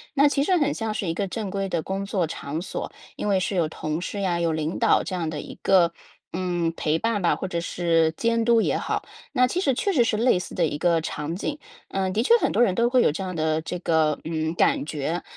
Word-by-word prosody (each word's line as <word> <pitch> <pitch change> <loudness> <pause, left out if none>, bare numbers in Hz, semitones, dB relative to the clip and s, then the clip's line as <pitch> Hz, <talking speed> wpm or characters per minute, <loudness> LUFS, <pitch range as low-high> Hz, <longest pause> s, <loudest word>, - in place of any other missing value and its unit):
那 285 +1 +6
其 280 -1 +1
实 365 +4 +3
很 290 -2 +1
像 225 -1 -3
是 190 - -2
一 165 - 0
个 195 +4 -2
正 200 0 -4
规 195 0 -2
的 170 -3 -1
工 195 +1 -3
作 195 -3 0
场 155 -1 -5
所， - - -5 0.2
因 - - -4
为 195 -2 +3
是 190 +2 -2
有 170 -3 +2
同 155 +1 -3
事 200 +2 -4
呀， 175 -3 0
有 170 -1 +1
领 155 +1 -2
导 - - +4
这 185 - -4
样 165 -3 -2
的 155 -2 -4
一 - - -10
个， 180 -3 +4 0.4
嗯， 175 -2 -1
陪 155 +1 0
伴 225 -3 0
吧， 170 - +3
或 190 - -4
者 170 -2 -2
是 165 -2 +1
监 230 +2 +1
督 235 -1 +5
也 - - +1
好， - - -2 0.3
那 250 0 +4
其 350 - -2
实 270 -7 +2
确 400 - 0
实 275 -10 +4
是 230 -1 0
类 230 -2 +3
似 180 - -6
的 175 - 0
一 145 - -3
个 165 +1 +2
场 160 +1 -4
景。 290 +10 -3 0.3
呃， 190 -1 -1
的 215 +4 +1
确 465 - +5
很 - - +1
多 - - +2
人 195 -6 +3
都 235 +3 +3
会 250 0 +4
有 - - +4
这 190 +5 -4
样 185 -2 -4
的 155 0 +1
这 180 +2 -4
个， 160 -3 +1
嗯， 160 0 -2
感 170 - +2
觉。 155 +3 -3
180 Hz, 275 characters per minute, -24 LUFS, 165-225 Hz, 0.4 s, 那